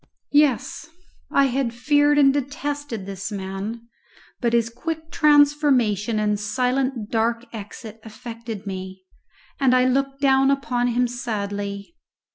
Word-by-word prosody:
Yes! 295 +2 +2 0.4
I 280 - +4
had 255 -2 -1
feared 290 +3 +3
and 275 -2 +6
detested 285 -5 -4
this 195 +2 -6
man, 200 +4 -5 0.5
but 235 -2 0
his 230 -1 +2
quick 320 +5 -5
transformation 280 -8 +3
and 210 -1 0
silent 250 +1 -1
dark 230 +1 0
exit 220 +1 -9
affected 225 -1 -8
me, 190 -1 -7 0.6
and 260 -2 +4
I 255 0 +4
looked 275 +1 0
down 270 -1 +4
upon 255 -3 0
him 245 +1 +1
sadly. 205 -1 -4
240 Hz, 120 wpm, -23 LUFS, 215-275 Hz, 0.6 s, and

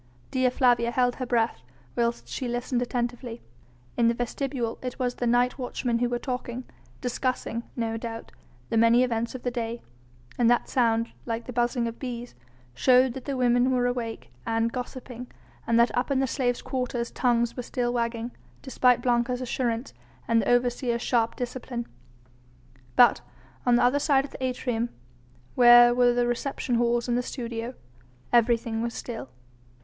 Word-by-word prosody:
Dea 255 -1 +2
Flavia 245 -2 +3
held 245 0 +1
her 255 - -4
breath 230 - +1 0.3
whilst 235 0 -1
she 255 - -4
listened 245 +1 -1
attentively. 240 -1 -3 0.5
In 235 - +3
the 235 - +2
vestibule 245 0 -3
it 250 -1 -5
was 250 -2 -1
the 245 - -2
night 245 +2 +2
watchmen 245 -1 -1
who 245 0 +1
were 240 - 0
talking, 250 0 -4 0.4
discussing, 250 -1 -2
no 225 -2 -2
doubt, 225 0 -7 0.4
the 230 - 0
many 230 +2 +5
events 235 0 -1
of 255 - -7
the 245 - -1
day: 235 -1 -3 0.6
and 235 -1 +5
that 240 - +2
sound 230 -2 +1 0.2
like 230 0 -3
the 250 - -7
buzzing 240 0 +1
of 230 - -7
bees 245 -2 -6 0.4
showed 250 - +4
that 265 - -8
the 275 -2 -2
women 245 0 +3
were 250 -1 +2
awake 240 -2 -3
and 225 0 0
gossiping, 250 -1 -6 0.4
and 230 0 +3
that 235 - +3
up 245 +3 0
in 275 -1 +2
the 270 - +2
slaves' 245 -2 -1
quarters 250 -2 -2
tongues 235 -2 +1
were 250 - -3
still 245 0 -2
wagging, 235 0 -2 0.3
despite 250 -2 +3
Blanca's 245 0 +1
assurance 245 -1 -2 0.3
and 230 0 +3
the - - -1
overseer's 245 0 +1
sharp 230 -2 +1
discipline. 245 -1 -4 1.1
But 245 - +6 0.5
on 245 - +6
the 240 - +3
other 255 +4 +3
side 280 -2 +3
of - - -11
the - - -7
atrium, 245 -2 -1 0.6
where 240 -1 +8
were 245 0 +4
the 245 0 +2
reception 245 +1 -2
halls 235 0 +2
and 240 - +1
the 245 - +2
studio, 235 -1 -5 0.6
everything 230 -1 +2
was 235 0 -3
still. 225 - -6
240 Hz, 165 wpm, -26 LUFS, 235-250 Hz, 1.1 s, where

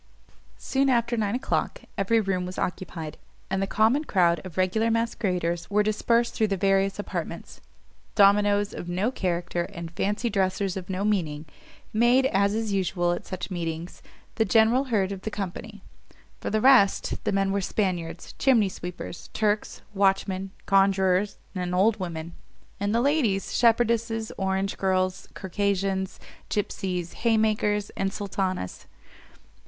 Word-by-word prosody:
Soon 275 0 +1
after 235 -1 +2
nine 215 -1 0
o'clock, 385 - -1
every 215 +4 +2
room 190 -3 -1
was 180 +1 -6
occupied, 165 -4 -4 0.3
and 190 0 0
the 195 - 0
common 225 +9 +3
crowd 170 - +2
of 185 -2 -10
regular 185 +5 +2
masqueraders 185 -7 -1
were 210 +1 +3
dispersed 230 +3 +1
through 220 - +1
the 195 -1 -1
various 195 +1 +2
apartments. 205 - -6 0.5
Dominos 205 0 +4
of 175 - -6
no 190 +7 0
character, 175 -5 -2
and 170 -4 -8
fancy 205 +7 -1
dresses 195 -2 0
of 185 -1 -6
no 190 +2 -1
meaning, 160 -8 -1 0.5
made, 240 +4 +4
as 200 -4 +2
is 220 -2 -1
usual 180 -2 +1
at 175 - -4
such 185 +1 -5
meetings, 170 -1 -4 0.4
the 225 - +4
general 225 +4 +4
herd 205 -7 0
of 195 -1 -5
the 220 - -3
company: 205 +1 -6 0.6
for - - -3
the 215 0 +1
rest, 255 -7 +4
the - - 0
men 195 0 +1
were 200 0 0
Spaniards, 175 -4 -2
chimney 230 -7 +4
sweepers, 180 -1 -7
Turks, 210 -1 0
watchmen, 195 -1 +1 0.2
conjurers, 195 0 +3 0.2
and 180 -2 -2
old 210 +4 +3
women; 170 -2 -5 0.5
and 205 +2 0
the 235 - +3
ladies, 245 -9 +1
shepherdesses, 230 -1 +2
orange 190 0 -1
girls, 185 -1 0
Circassians, 195 0 -1 0.3
gipseys, 185 -4 -2
haymakers, 215 -2 +1
and 195 0 -2
sultanas. 190 - -3
195 Hz, 140 wpm, -26 LUFS, 185-220 Hz, 0.6 s, Dominos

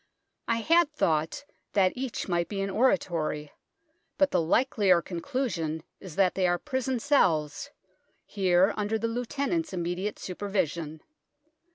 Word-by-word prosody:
I 230 0 +1
had 330 +4 +4
thought 160 - 0 0.3
that 190 -2 +3
each 255 -1 -4
might 170 -2 0
be 200 - -4
an 195 0 -2
oratory, 170 - 0 0.7
but 290 -1 +3
the 180 - +2
likelier 195 0 +3
conclu 255 +11 -3
sion 160 -2 -3 0.2
is 180 -5 -10
that 190 -2 +3
they 185 -1 +1
are 175 0 +2
prison 260 0 -2
cells, 175 - +1 0.6
here 190 -1 +3
under 210 +1 -1
the 225 +1 -1
Lieutenant's 280 +7 -2
immediate 180 +4 -2
supervision. 170 -5 -3
195 Hz, 135 wpm, -28 LUFS, 170-250 Hz, 0.7 s, had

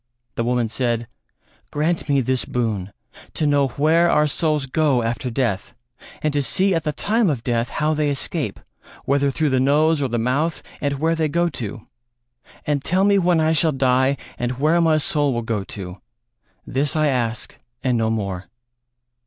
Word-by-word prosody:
The 115 - -2
woman 120 -1 +1
said: 120 0 -1 0.6
"Grant 155 +1 -1
me 140 -1 +3
this 130 +1 0
boon 105 -6 -2 0.4
to 155 - 0
know 145 -1 +3
where 160 +6 +3
our 150 0 +4
souls 150 -1 0
go 135 -3 +1
after 120 +3 -2
death, 120 -2 -2 0.5
and 155 -1 +1
to 145 - +2
see 190 +7 +1
at 165 -2 0
the 150 - +1
time 215 +5 +1
of 130 -6 -2
death 120 -1 0
how 155 +1 0
they 150 -1 +1
escape, 140 -2 -3 0.5
whether 140 +1 +2
through 150 +1 0
the 130 - +2
nose 150 +3 +3
or 135 - +1
the 120 -1 -2
mouth, 135 +8 0 0.2
and 140 -1 -1
where 160 +4 +1
they 160 -1 +1
go 170 +3 +1
to; 115 -5 -6 0.8
and 145 -2 0
tell 185 +3 +2
me 200 0 +4
when 175 -2 +3
I 160 0 +3
shall 160 0 +3
die 130 0 +2 0.2
and 120 +1 -1
where 155 +6 +2
my 160 -2 +4
soul 145 -3 +1
will 120 - -2
go 110 -3 -2
to; 95 -2 -8 0.6
this 140 +3 -1
I 155 -1 +2
ask 120 -5 -1 0.3
and 130 -3 +2
no 115 -1 +1
more." 100 -4 -3
140 Hz, 180 wpm, -21 LUFS, 120-155 Hz, 0.8 s, our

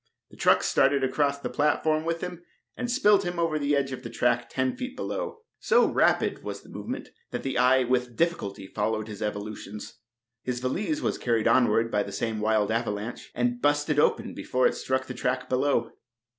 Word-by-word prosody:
The - - -14
truck - - +4
started 135 0 +3
across 140 +2 +1
the 140 - -4
platform 155 +1 +1
with 165 0 -1
him 180 -1 -5 0.3
and 250 -1 -3
spilled 210 -6 +4
him 175 -1 -3
over 165 -2 +1
the 145 0 +1
edge 135 -1 0
on 130 - -6
the 115 - -7
track 120 0 +1
ten 130 -1 -1
feet 255 +1 -6
below. 460 - -4 0.2
So 475 +1 +4
rapid - - +2
was - - -5
the - - -17
movement - - -6 0.2
that - - -4
the 135 - -2
eye 130 +1 +5
with 125 -1 0
difficulty 160 - -1
followed 110 +2 -2
his 105 -3 -8
evolutions. 105 0 -5 0.4
His 125 0 -3
valise 210 - -1
was - - -1
carried 115 -2 +1
onward 115 -1 +3
by 105 - +2
the 100 - -5
same 110 +2 -2
wild 110 -1 +2
avalanche, 110 0 -3
and 120 0 0
"busted" 145 0 +2
open - - +2
before 125 0 0
it - - +4
struck 130 0 -1
the 125 - -6
track 130 0 -2
below. 130 -3 +1
130 Hz, 190 wpm, -27 LUFS, 115-155 Hz, 0.4 s, eye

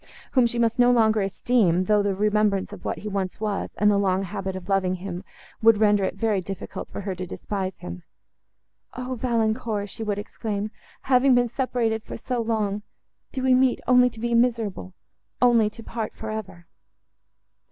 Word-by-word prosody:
whom 255 -3 +4
she 235 - -4
must 230 0 +1
no 245 0 +6
longer 220 -3 +4
esteem, 195 -2 +2
though 210 +2 +3
the 200 -1 0
remembrance 210 -1 +1
of - - -10
what - - -2
he 210 - -7
once 195 -3 -3
was, 210 -2 -3
and 210 0 +4
the 200 - +3
long 190 -1 +1
habit 195 0 -4
of 185 -1 -7
loving 190 -2 +1
him, 180 -1 -6 0.4
would 225 -1 +6
render 205 -2 +3
it - - -1
very 215 -4 0
difficult 195 +1 -7
for - - -6
her 195 -1 -3
to 180 0 -6
despise 190 0 -4
him. 90 +1 -8 1.0
"O 255 +1 -3
Valancourt!" 225 -3 -1
she 230 - -8
would 210 -2 -1
exclaim, 210 0 -4 0.3
"having 260 0 +4
been 245 -1 +3
separated 235 -3 -1 0.2
so 250 -2 -2
long—do 220 +3 -4
we 260 0 +4
meet, 255 0 +3
only 250 0 +5
to 225 - -13
be 235 +1 -1
miserable—only 230 0 0
to 230 +2 -12
part 225 -1 -5
for 220 0 -6
ever?" 190 -5 -7
215 Hz, 175 wpm, -25 LUFS, 195-235 Hz, 1.0 s, no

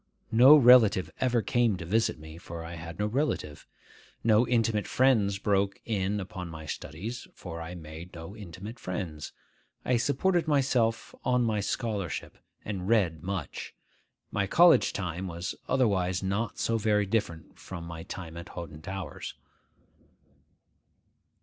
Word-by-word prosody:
No 125 +6 +9
relative 120 -8 +6
ever 125 -3 +2
came 120 -5 +2
to 85 - -7
visit 110 +6 +1
me, 80 +1 -11
for 85 -1 -7
I 85 - -7
had 85 0 -8
no 105 - 0
relative. 105 - -2 0.6
No 110 +1 +4
intimate 115 -3 +1
friends 110 -7 +3
broke 100 -1 +1
in 105 -2 -1
upon 95 -2 -6
my 80 -1 -8
studies, 100 - -6
for 85 -2 -7
I 85 +2 -6
made 80 +2 -10
no 85 +4 -8
intimate 105 +2 -9
friends. 85 -6 -5 0.5
I 125 - +3
supported 155 +7 +1
myself 130 -6 +1
on 125 -1 +2
my 110 -2 +1
scholarship, 100 -5 -3 0.3
and 95 -3 -4
read 95 -9 +2
much. 90 -6 -5 0.6
My 100 -1 0
college 170 - +6
time 90 -1 -4
was 85 0 -4
otherwise 95 -8 +1
not 100 +3 -1
so 115 0 0
very 105 -1 +2
different 95 -6 -3
from 85 -3 -7
my 85 -1 -7
time 85 -1 -8
at 85 - -8
Hoghton 80 -3 -8
Towers. 95 -2 -6
100 Hz, 140 wpm, -29 LUFS, 85-115 Hz, 0.6 s, No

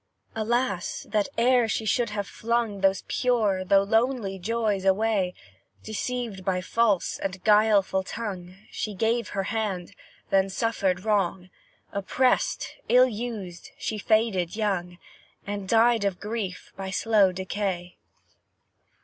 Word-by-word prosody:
Alas! 225 -4 -1
that 210 +1 +1 0.4
she 220 - -1
should 230 +3 +1
e'er - - -8
have 205 -1 -3
flung 230 -3 -1
Those 195 -1 +2
pure, 220 -7 +1
though 195 +1 +4
lonely 225 -2 0
joys 215 -1 -1
away 195 -1 +1 0.5
Deceived 220 -2 -4
by 185 -1 0
false 205 0 +1
and 190 -1 -4
guileful 210 -3 +4
tongue, 185 -3 -6 0.2
She 210 -2 -4
gave 225 +3 +1
her 195 - -2
hand, 195 -4 -3 0.4
then 195 0 +3
suffered 195 -3 -1
wrong; 190 -3 0 0.4
Oppressed, 250 +6 0
ill 250 +2 +6
used, 210 -7 -6
she 215 - -3
faded 210 -5 +1
young, 185 -5 -1 0.5
And 200 -1 -5
died 230 -1 +4
of 195 -3 -1
grief 210 -4 -5
by 195 -1 -5
slow 205 0 +3
decay. 185 -1 -3
205 Hz, 125 wpm, -26 LUFS, 190-225 Hz, 0.5 s, ill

